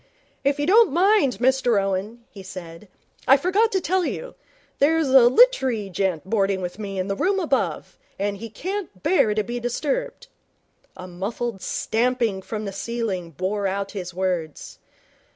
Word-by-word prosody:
'If 280 Hz, +1 st, +1 dB
you 290 Hz, -, +1 dB
don't 425 Hz, +3 st, +5 dB
mind, 350 Hz, -, +3 dB
Mr 250 Hz, -2 st, +2 dB
Owen,' 195 Hz, +4 st, -3 dB
he 195 Hz, -, -11 dB
said. 175 Hz, 0 st, -10 dB, 0.4 s
'I 270 Hz, -, +7 dB
forgot 390 Hz, +9 st, +2 dB
to 385 Hz, -, +1 dB
tell 370 Hz, 0 st, 0 dB
you. -, -, -4 dB, 0.5 s
There's 315 Hz, 0 st, +3 dB
a 260 Hz, -2 st, +7 dB
lit'ery 260 Hz, -, +3 dB
gent 185 Hz, -2 st, -1 dB
boarding 195 Hz, -2 st, +1 dB
with 180 Hz, +2 st, -6 dB
me 200 Hz, -2 st, -5 dB
in 185 Hz, 0 st, -2 dB
the 195 Hz, -, -1 dB
room 390 Hz, -, +1 dB
above, 305 Hz, -7 st, -2 dB, 0.2 s
and 200 Hz, +1 st, -2 dB
he 230 Hz, +3 st, -8 dB
can't 355 Hz, -, -6 dB
bear 265 Hz, -, +3 dB
to 215 Hz, -, +1 dB
be 240 Hz, +2 st, -4 dB
disturbed.' 265 Hz, -, -3 dB, 0.7 s
A 185 Hz, 0 st, -8 dB
muffled 195 Hz, +4 st, -4 dB
stamping 230 Hz, -4 st, 0 dB
from 215 Hz, +2 st, -5 dB
the 200 Hz, -, -5 dB
ceiling 200 Hz, -5 st, -3 dB
bore 190 Hz, +6 st, -2 dB
out 195 Hz, +1 st, -3 dB
his 180 Hz, -3 st, -6 dB
words. 180 Hz, -4 st, -3 dB
220 Hz, 160 wpm, -23 LUFS, 195-280 Hz, 0.7 s, I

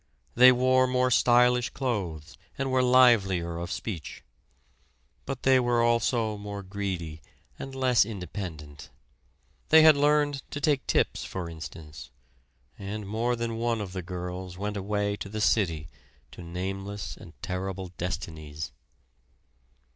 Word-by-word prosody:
They 125 Hz, +2 st, +8 dB
wore 130 Hz, +1 st, +3 dB
more 125 Hz, 0 st, +1 dB
stylish 125 Hz, 0 st, +4 dB
clothes 90 Hz, -, -4 dB, 0.2 s
and 135 Hz, -1 st, -2 dB
were 130 Hz, 0 st, +3 dB
livelier 100 Hz, -10 st, +4 dB
of 85 Hz, -, -5 dB
speech; 90 Hz, -9 st, -6 dB, 1.0 s
but 135 Hz, -2 st, -5 dB
they 130 Hz, -1 st, +5 dB
were 120 Hz, -1 st, +2 dB
also 115 Hz, -2 st, +1 dB
more 100 Hz, -1 st, -6 dB
greedy 95 Hz, -5 st, -5 dB, 0.4 s
and 135 Hz, 0 st, -7 dB
less 130 Hz, -3 st, +4 dB
independent. 90 Hz, -7 st, -7 dB, 0.8 s
They 160 Hz, 0 st, +8 dB
had 155 Hz, -1 st, +8 dB
learned 145 Hz, -1 st, +2 dB
to 145 Hz, -, -5 dB
take 145 Hz, -2 st, +1 dB
tips, -, -, +1 dB
for 95 Hz, -3 st, -5 dB
instance; 80 Hz, -3 st, -9 dB, 0.7 s
and 105 Hz, +1 st, -5 dB
more 115 Hz, +4 st, 0 dB
than 115 Hz, -1 st, -3 dB
one 115 Hz, -1 st, 0 dB
of 100 Hz, -3 st, -5 dB
the 95 Hz, -, -3 dB
girls 90 Hz, 0 st, -6 dB
went 105 Hz, +2 st, -3 dB
away 100 Hz, +1 st, -1 dB
to 100 Hz, -, -7 dB
the 110 Hz, +1 st, -5 dB
city 85 Hz, -5 st, +1 dB, 0.4 s
to -, -, -11 dB
nameless 95 Hz, +3 st, -5 dB
and 80 Hz, -, -15 dB
terrible 95 Hz, 0 st, -4 dB
destinies. 80 Hz, -4 st, -5 dB
105 Hz, 130 wpm, -27 LUFS, 90-125 Hz, 1.0 s, They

